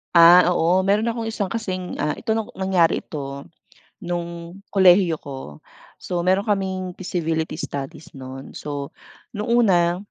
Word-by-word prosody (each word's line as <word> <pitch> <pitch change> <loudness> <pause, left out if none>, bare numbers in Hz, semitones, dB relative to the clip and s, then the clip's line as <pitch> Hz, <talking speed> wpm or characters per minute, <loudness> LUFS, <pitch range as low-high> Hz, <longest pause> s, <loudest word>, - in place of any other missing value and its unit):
Ah 170 +2 +9
oo 180 +2 +3
meron 205 +4 +2
akong 230 -1 -2
isang 205 -4 -3
kasing 185 -5 -4
ah, 150 - -1
ito 220 - -1 0.2
nangyari 190 -3 +2
ito 140 -2 -6 0.5
nung 170 0 -6
kolehiyo 185 -3 +5
ko. 135 - -9 0.4
So 175 -1 -3
meron 190 +4 +2
kaming 190 -3 -1
feasibility 165 -4 -3
studies 140 -1 -6
nun. 135 0 -9
So 145 -1 -6 0.4
nung 210 +1 -4
una, 180 -8 +3
175 Hz, 130 wpm, -22 LUFS, 160-195 Hz, 0.5 s, Ah